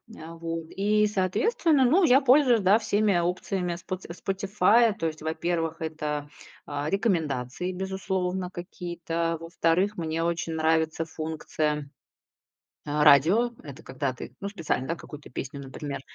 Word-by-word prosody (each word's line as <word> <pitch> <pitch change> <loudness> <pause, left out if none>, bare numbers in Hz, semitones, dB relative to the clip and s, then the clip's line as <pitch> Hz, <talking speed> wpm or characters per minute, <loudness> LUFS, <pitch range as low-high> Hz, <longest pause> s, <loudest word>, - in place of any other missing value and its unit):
А, 165 +1 -9
вот 165 0 -4
и, 210 +2 +2
соответственно, 265 - +2
ну, 330 +10 +4
я 270 -4 +6
пользуюсь, 255 -4 +5
да, 195 +3 +5
всеми 210 -3 +2
опциями 180 +1 -1
Споти 185 +2 -6
Spotify. 195 +5 +2
То 165 - -1
есть, 155 -1 -6
во-первых, 165 +1 -2
это, 150 -2 -3 0.4
а, 145 +1 -3
рекомендации, 165 - -1
безусловно, 190 -1 -2
какие-то. 170 -2 -3
Во-вторых, 170 +4 0
мне 165 -1 -2
очень 170 -1 -1
нравится 160 0 +1
функция, 155 -2 -3 1.0
а, 150 0 +1
радио. 170 - +5
Это 145 0 -11
когда 135 -1 -2
ты, 125 - -9
ну, 200 - -3
специально, 165 -9 -2
да, 165 - -1
какую-то 150 -2 -11
песню, 135 +3 -6
например, 140 +1 -6
170 Hz, 135 wpm, -27 LUFS, 155-195 Hz, 1.0 s, я